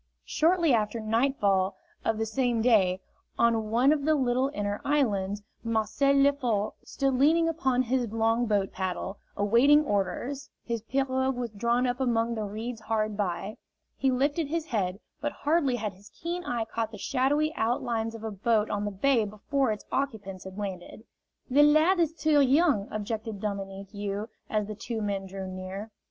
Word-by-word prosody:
Shortly 335 -2 +3
after 220 0 +1
nightfall 215 -4 +1 0.3
of 225 - 0
the 225 - 0
same 235 0 0
day, 190 -6 +3 0.4
on 225 -2 +2
one 245 +5 +4
of 290 -2 -2
the 310 +1 +3
little 260 -1 +1
inner 205 -2 -3
islands, 205 -8 0 0.2
Marcel 230 +5 +1
Lefort 270 -7 +2
stood 275 -1 -1
leaning 315 +6 +4
upon 265 -6 +1
his 250 0 0
long 225 +1 +1
boat 200 -3 +1
paddle, 190 +1 -4 0.2
awaiting 245 +9 +5
orders; 250 +7 -2
his 230 -2 -3
pirogue 260 +2 0
was 240 -2 -3
drawn 235 +4 +1
up 245 0 -1
among 235 -2 +1
the 215 -2 -3
reeds 220 +3 -5
hard 215 -1 -1
by. 195 +1 -3 0.4
He 270 - +1
lifted 285 +5 +1
his 325 +1 -2
head, 195 - -1 0.2
but 295 0 -1
hardly 290 -4 +1
had 210 -4 -3
his 195 +3 -17
keen 345 +2 -5
eye 235 -2 -1
caught 225 0 -3
the 215 - -8
shadowy 285 +7 +1
outlines 230 -3 -1
of 225 - -9
a 220 - -3
boat 215 +2 +1
on 205 0 -1
the - - 0
bay 235 +4 +2
before 220 +5 -1
its 210 - -5
occupants 205 -9 -3
had 190 +1 -9
landed. 195 0 -6 0.4
"The 280 +2 +4
lad 310 +5 +5
is 325 -1 +1
too 305 -3 +3
young," 275 - +3
objected 215 0 -4
Dominique 195 -1 -5
You, 205 +1 -4 0.2
as 215 -1 0
the 215 - -5
two 225 +2 -5
men 200 -2 -2
drew 190 0 -6
near. 185 +3 -6
230 Hz, 170 wpm, -28 LUFS, 205-270 Hz, 0.4 s, awaiting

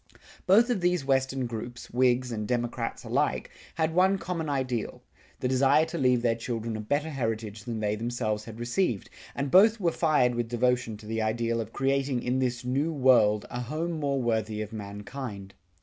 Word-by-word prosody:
Both 225 +6 +5
of 215 -6 0
these 175 -4 +1
Western 135 -1 +1
groups, 120 +1 -7
Whigs 125 0 +2
and 105 -2 -3
Democrats 120 -1 -2
alike, - - -1 0.2
had 160 0 0
one 190 +3 +4
common 170 -3 -3
ideal: 130 -5 -2 0.4
the - - +1
desire 135 +4 +4
to 160 - -5
leave 125 -2 +3
their 115 -1 +3
children 115 -1 -4
a - - -4
better 145 +8 -1
heritage 110 -5 -3
than 115 -3 -4
they 105 0 0
themselves 110 -2 -2
had 115 0 -9
received, 120 - -1 0.2
and 140 -1 -2
both 215 +4 +6
were 175 -4 +2
fired 150 -7 +2
with 120 -1 -2
devotion 120 -2 0
to 105 - -14
the 110 +1 -2
ideal 115 +1 0
of 110 0 -7
creating 135 -1 0
in 125 +1 0
this 125 -2 -1
New 140 +6 0
World 125 -7 +4
a 120 - -3
home 155 +8 -3
more 145 -4 -1
worthy 110 -3 -1
of 105 +1 -10
mankind. 105 0 -7
125 Hz, 180 wpm, -28 LUFS, 115-140 Hz, 0.4 s, both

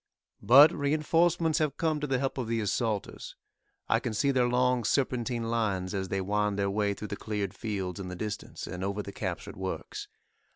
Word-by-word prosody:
But 140 +6 +8
reinforcements 160 +3 +2
have 150 -3 0
come 160 -2 +1
to 150 - -2
the 135 -1 +1
help 135 +1 -2
of 125 - -2
the 115 0 0
assaulters. 110 0 -2 0.5
I - - +3
can 115 -3 -3
see 140 +6 +2
their 125 -2 +3
long 125 0 +2
serpentine 125 -2 0
lines 105 -5 -1
as 95 -1 -2
they 95 - -1
wind 105 +1 0
their 100 -1 0
way 100 0 0
through 105 - -7
the 105 - -3
cleared 105 -2 -3
fields 95 -3 -4
in 95 - -5
the 90 - -6
distance, 105 +2 -5
and 90 +1 -6
over 100 +2 -2
the 100 - -7
captured - - -5
works. - - -5
115 Hz, 195 wpm, -29 LUFS, 100-135 Hz, 0.5 s, But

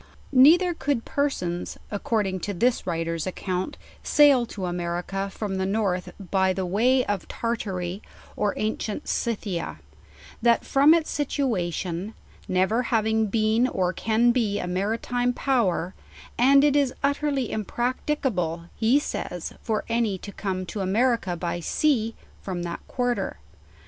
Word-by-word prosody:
Neither 335 +7 +6
could 275 -6 -1
persons, 180 -12 -2
according 205 -2 -1
to 200 +2 -4
this 240 +5 +1
writers 165 0 -2
account, 185 0 -3 0.2
sail 280 -5 +5
to 195 -4 -5
America 175 +2 -3
from 195 -1 -4
the 190 - 0
north 195 -3 -1 0.2
by 190 -1 +3
the 190 0 -2
way 245 +8 +3
of 205 -3 -2
Tarta 230 -3 -2
ry 180 +2 -4 0.3
or 205 -1 0
ancient 215 +3 -3
Scythia; 195 - -2 0.6
that 235 0 +3
from 285 +4 +6
its 325 -2 -1
situation, 200 - -2 0.3
never 190 +6 +2
having 220 -1 +2
been 220 +3 +2
or 185 -6 0
can 225 +4 +2
be 225 -5 +1
a - - -3
maratime 225 +7 -1
power; 195 -9 +1 0.4
and 275 +3 +5
it 290 -1 +4
is 280 -3 +2
utterly 280 -3 0
impracti 245 +7 -2
cable, 170 - -2
he 235 +5 +3
says, 180 - -4
for 220 -3 -2
any 230 -4 0
to 200 - -9
come 185 -2 -3
to 205 - -6
America 210 -1 +1
by 175 0 -2
sea 230 - +1 0.3
from 180 -3 -4
that 170 -1 -4
quarter. 245 -1 -1
215 Hz, 140 wpm, -25 LUFS, 185-245 Hz, 0.6 s, Neither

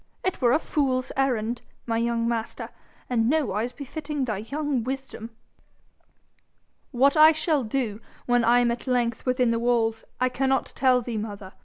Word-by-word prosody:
It 375 -5 -2
were 240 -2 +4
a 260 - +5
fool's 265 -5 -1
errand, 240 -3 0 0.2
my 230 -1 0
young 230 0 0
master, 230 -1 -3 0.4
and 230 -2 +1
nowise 245 -6 0
befitting 285 +1 -4
thy 215 -5 -2
young 280 +2 -2
wisdom.' 265 -3 -5 1.6
'What 275 +2 +3
I 310 +1 +8
shall 310 -3 0
do, 225 -2 -2 0.2
when 245 -1 +2
I 240 +2 +5
am 235 -1 +2
length 240 -1 0
within 250 -2 +2
the 230 - 0
walls, 230 -2 +1 0.2
I 255 - +3
cannot 265 +1 0
tell 255 -2 +3
thee, 235 -1 -4
mother. 205 -3 -6
245 Hz, 155 wpm, -25 LUFS, 230-270 Hz, 1.6 s, I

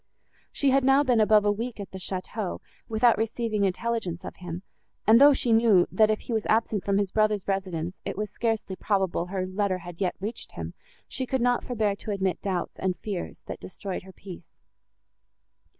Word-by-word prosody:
She 280 -2 +2
had 270 0 +4
now 270 +2 +5
been 250 -4 +3
above 215 -1 +5
a 205 - +4
week 230 +2 -4
at 200 - -7
the 190 - -7
château, 185 +2 -4 0.3
without 225 +1 +4
receiving 225 -1 -1
intelligence 190 -3 -2
of - - -7
him, 175 0 -6 0.4
and, 225 +4 +7
though 290 +1 +9
she 245 -4 +2
knew, 225 -5 +5
that, 215 +3 +4
if 215 - 0
he 240 - -5
was 220 -1 -1
absent 220 -2 +1
from 200 -1 +1
his 200 -2 0
brother's 215 -2 +1
residence, 185 -3 -2
it - - -4
was 210 0 -3
scarcely 225 -4 -1
probable 190 -4 0
her 185 0 -2
letter 185 0 0
had 175 0 -10
yet 185 - 0
reached 210 +5 -5
him, - - -6 0.3
she 260 - -4
could 265 - 0
not 245 0 +2
forbear 215 -5 0
to - - -9
admit 190 -3 -1
doubts 185 -3 -3
and 185 -2 -1
fears, 195 -1 -5
that - - -6
destroyed 190 0 -6
her 190 - -13
peace. 180 -2 -11
205 Hz, 195 wpm, -27 LUFS, 185-225 Hz, 0.4 s, though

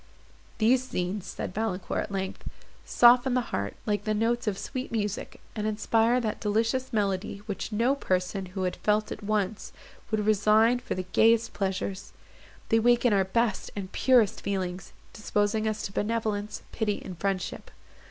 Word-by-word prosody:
"These 250 +3 +3
scenes," 180 +2 -3
said 180 - -5
Valancourt, 200 -3 -2
at 205 - -13
length, 190 -1 -4 0.4
"soften 245 +1 +5
the 250 -2 -1
heart, 100 0 -2
like 205 -1 0
the 215 -1 0
notes 230 +2 0
of 200 -2 0
sweet 255 +5 -5
music, 210 -3 -3 0.2
and 215 -1 -2
inspire 225 +3 +2
that 220 -3 -2
delicious 225 +5 0
melancholy 200 -2 -1
which 205 +1 -4
no 230 +5 +2
person, 190 -6 -1
who 185 +1 -4
had 180 - -1
felt 215 0 +1
it - - -6
once, 210 0 -2 0.4
would 215 -2 0
resign 215 +3 +4
for 245 - -4
the 185 0 -4
gayest 230 0 +4
pleasures. 195 0 -3 0.6
They 225 - +4
waken 240 0 +4
our 195 -1 +3
best 225 +1 0
and 195 -2 -5
purest 245 -6 +3
feelings, 185 -2 -3 0.2
disposing 210 0 0
us 215 0 -2
to - - -4
benevolence, 210 -1 -2
pity, 210 -3 -1
and 185 - -6
friendship. 190 0 -3
210 Hz, 160 wpm, -27 LUFS, 195-230 Hz, 0.6 s, soften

